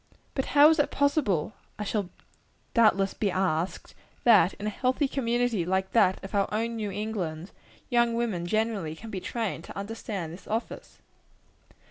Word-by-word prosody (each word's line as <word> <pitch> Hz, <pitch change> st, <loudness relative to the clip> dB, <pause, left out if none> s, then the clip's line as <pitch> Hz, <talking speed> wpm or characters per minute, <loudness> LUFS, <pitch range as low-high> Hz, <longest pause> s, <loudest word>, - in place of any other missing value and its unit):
But 265 Hz, -, -1 dB
how 290 Hz, +1 st, +10 dB
is 320 Hz, -, +1 dB
it 290 Hz, -, +3 dB
possible, 265 Hz, -, +1 dB, 0.2 s
I 210 Hz, -, -3 dB
shall 205 Hz, -3 st, -2 dB, 0.6 s
doubtless 205 Hz, -4 st, +4 dB
be 205 Hz, -, 0 dB
asked, 180 Hz, -2 st, -1 dB, 0.3 s
that 205 Hz, -7 st, +6 dB
in 205 Hz, -, -7 dB
a -, -, +1 dB
healthy 260 Hz, +6 st, 0 dB
community 240 Hz, -6 st, 0 dB
like 190 Hz, +2 st, -1 dB
that 195 Hz, -5 st, +3 dB
of 195 Hz, -, -8 dB
our 200 Hz, -1 st, +1 dB
own 230 Hz, +2 st, -1 dB
New 215 Hz, -2 st, -3 dB
England, 190 Hz, -5 st, -4 dB, 0.4 s
young 235 Hz, -1 st, +3 dB
women 215 Hz, -8 st, -1 dB
generally 215 Hz, -6 st, -1 dB
can 220 Hz, +6 st, -10 dB
be 190 Hz, -, -3 dB
trained 220 Hz, -6 st, -3 dB
to -, -, -10 dB
understand 200 Hz, -5 st, -5 dB
this 180 Hz, -, -12 dB
office? 225 Hz, +2 st, -4 dB
210 Hz, 160 wpm, -27 LUFS, 190-235 Hz, 0.6 s, how